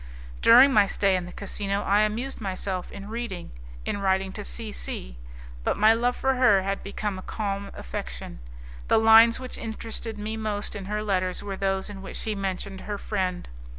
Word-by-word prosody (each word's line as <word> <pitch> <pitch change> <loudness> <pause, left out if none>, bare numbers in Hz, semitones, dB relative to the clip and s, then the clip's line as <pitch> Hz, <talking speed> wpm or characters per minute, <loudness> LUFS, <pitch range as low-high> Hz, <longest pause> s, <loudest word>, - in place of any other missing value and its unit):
During 260 +4 +8
my 205 -3 +6
stay 195 -1 +2
in 180 -1 -2
the - - -9
casino 200 0 -3
I 205 +1 +3
amused 225 +5 -1
myself 190 -2 -3
in 200 0 -8
reading, 220 -5 -5 0.3
in - - -2
writing 190 -1 +1
to 210 - -6
C 220 +1 -6
C, - - -6 0.4
but - - 0
my 215 +2 +6
love 245 +2 +1
for 265 +1 +1
her 245 -7 +4
had 195 +1 -2
become 200 -1 -4
a - - -8
calm 200 -1 -3
affection. - - -6 0.5
The - - +4
lines 225 +1 +7
which 255 -1 -5
interested 225 0 -5
me 215 +1 -4
most 215 -2 -3
in 200 -2 -5
her 210 +2 -2
letters 185 -3 -1
were 200 -1 -4
those 195 0 -1
in 200 -2 -8
which 190 - -8
she 220 - -1
mentioned 195 -1 -4
her 205 -1 -4
friend. 185 -4 -2
205 Hz, 185 wpm, -26 LUFS, 190-220 Hz, 0.5 s, During